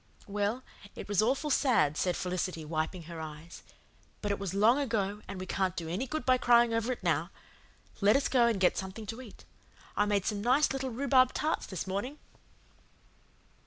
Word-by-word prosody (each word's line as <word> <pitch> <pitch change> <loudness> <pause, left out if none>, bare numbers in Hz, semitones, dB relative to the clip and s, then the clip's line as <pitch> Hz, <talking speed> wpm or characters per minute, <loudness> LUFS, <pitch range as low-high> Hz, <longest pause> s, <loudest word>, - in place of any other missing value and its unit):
"Well, 205 +5 -2 0.3
it - - -8
was 205 -1 +2
awful 270 +6 0
said," 190 - +3
said 180 +2 0
Felicity, 180 -3 -3
wiping 160 +3 -3
her 165 0 -8
eyes. 155 +2 -9 0.6
"But 205 - 0
it 200 - -1
was 195 -2 -4
long 225 +7 +4
ago 210 -6 -1
and 195 -1 -6
we 185 - -5
can't 190 -2 -1
do 165 - -4
any 185 +11 -2
good 310 +4 -4
by 255 -1 +4
crying 240 -1 +4
over 230 +2 0
it 250 - -5
now. - - +1 0.7
Let 205 +2 +4
us 275 - +2
go 245 -3 +4
and 225 -4 0
get 185 - +3
something 190 +3 -6
to 225 +4 -6
eat. 235 -5 -13 0.5
I 205 - +2
made 200 -2 +1
some 205 -2 -1
nice 260 +6 +3
little 265 -1 -2
rhubarb 255 +1 +3
tarts 310 +1 -1
this 185 -4 -4
morning." 200 +10 -4
205 Hz, 190 wpm, -30 LUFS, 185-250 Hz, 0.7 s, long